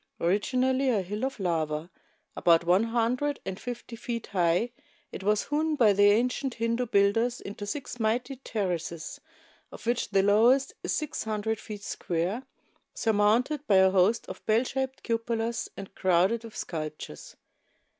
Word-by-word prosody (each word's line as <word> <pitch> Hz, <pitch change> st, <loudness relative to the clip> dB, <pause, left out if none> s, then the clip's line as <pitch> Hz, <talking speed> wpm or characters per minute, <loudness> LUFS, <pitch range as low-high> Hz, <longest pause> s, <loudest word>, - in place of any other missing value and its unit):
Originally 255 Hz, +9 st, +1 dB
a 210 Hz, -6 st, +1 dB
hill 210 Hz, +6 st, -5 dB
of 265 Hz, -3 st, -2 dB
lava, 160 Hz, -2 st, -1 dB, 0.4 s
about 170 Hz, -1 st, +4 dB
one 180 Hz, +6 st, +3 dB
hundred 245 Hz, +5 st, 0 dB
and 190 Hz, 0 st, -5 dB
fifty 245 Hz, -1 st, -6 dB
feet 230 Hz, 0 st, -4 dB
high, 180 Hz, +4 st, +1 dB, 0.4 s
it -, -, -7 dB
was 210 Hz, +2 st, +1 dB
hewn 305 Hz, +1 st, +1 dB
by 225 Hz, -7 st, +5 dB
the 205 Hz, +1 st, +4 dB
ancient 250 Hz, +4 st, +1 dB
Hindu 230 Hz, +2 st, -1 dB
builders 225 Hz, +4 st, +2 dB
into 205 Hz, +1 st, -7 dB
six 255 Hz, 0 st, -5 dB
mighty 240 Hz, +4 st, 0 dB
terraces, 180 Hz, -9 st, -4 dB, 0.5 s
of -, -, -11 dB
which 240 Hz, +1 st, 0 dB
the 195 Hz, -, +3 dB
lowest 235 Hz, +7 st, +4 dB
is -, -, -1 dB
six 305 Hz, -5 st, -3 dB
hundred 220 Hz, 0 st, -2 dB
feet 210 Hz, -2 st, -8 dB
square, 180 Hz, +8 st, -2 dB, 0.5 s
surmounted 230 Hz, +8 st, +2 dB
by 200 Hz, -, +4 dB
a 190 Hz, 0 st, +6 dB
host 190 Hz, +4 st, +3 dB
of -, -, -8 dB
bell 220 Hz, +2 st, +4 dB
shaped 265 Hz, +1 st, -3 dB
cupolas 230 Hz, 0 st, -1 dB
and 195 Hz, -1 st, -8 dB
crowded 190 Hz, +5 st, +2 dB
wdth 230 Hz, -2 st, -11 dB
sculptures. 155 Hz, -, -6 dB
220 Hz, 150 wpm, -28 LUFS, 190-245 Hz, 0.5 s, a